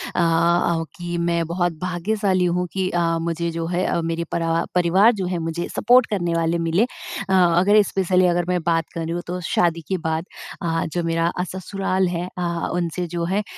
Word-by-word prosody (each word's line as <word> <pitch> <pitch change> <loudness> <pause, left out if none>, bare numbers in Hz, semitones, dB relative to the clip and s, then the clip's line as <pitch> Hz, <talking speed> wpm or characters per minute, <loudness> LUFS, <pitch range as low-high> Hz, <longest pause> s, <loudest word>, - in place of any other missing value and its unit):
अ - - 0
अ, 170 0 +2
कि 175 -1 -4
मैं 170 0 0
बहुत 175 0 0
भाग्यशाली 185 +1 0
हूँ 180 +1 0
कि 190 -1 0
अ, 175 - 0 0.2
मुझे 170 0 -2
जो 165 0 -3
है 180 +1 0
अ, - - 0
मेरे 165 0 -2
परा 165 0 0
परिवार 185 +6 +5
जो - - -1
है 180 -1 -2
मुझे 165 +1 -3
सपोर्ट 245 0 +5
करने 175 -5 -1
वाले 165 0 +1
मिले। 165 +4 +2
अ, 350 - -5
अगर 185 +3 +5
स्पेशली 185 -1 +2
अगर 175 0 +1
मैं 180 - +1
बात 165 -1 +2
कर 165 - -4
रही 165 +1 -3
हूँ 175 - -2
तो 180 +1 -3
शादी 170 -1 +1
के 190 - 0
बाद 160 +1 -1 0.4
अ, 165 -1 -1
जो 175 - -1
मेरा 165 0 +1
अ, 180 - +1
ससुराल 190 0 -1
है 175 0 -3
अ, 170 -1 -2
उनसे 175 0 -2
जो 170 0 -3
है 195 +4 0
175 Hz, 205 wpm, -22 LUFS, 170-185 Hz, 0.4 s, परिवार